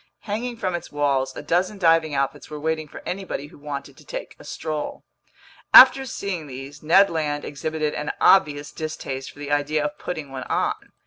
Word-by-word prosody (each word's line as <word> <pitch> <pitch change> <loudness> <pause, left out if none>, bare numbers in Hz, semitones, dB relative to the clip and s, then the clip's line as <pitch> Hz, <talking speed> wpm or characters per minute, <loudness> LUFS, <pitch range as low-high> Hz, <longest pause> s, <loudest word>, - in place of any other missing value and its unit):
Hanging 235 +3 -4
from 185 -4 -2
its 175 - -5
walls, 135 -2 0
a - - -7
dozen 180 +6 0
diving 165 -4 +3
outfits 140 +1 -2
were 150 -1 -6
waiting 155 0 -2
for - - -11
anybody 185 -6 -4
who 145 - -15
wanted 140 -1 -6
to - - -16
take - - -7
a - - -12
stroll. 155 -2 -5 0.7
After 265 +1 +10
seeing 185 -9 -4
these, 135 +2 -9
Ned 190 +6 +5
Land 150 -3 -2
exhibited 155 +1 -2
an 150 - -3
obvious 145 -6 +4
distaste 140 -4 -5
for - - -16
the 145 0 -6
idea 145 +1 +1
of 150 0 -4
putting 155 -6 -5
one 130 -1 -6
on. - - -2
150 Hz, 185 wpm, -23 LUFS, 145-175 Hz, 0.7 s, After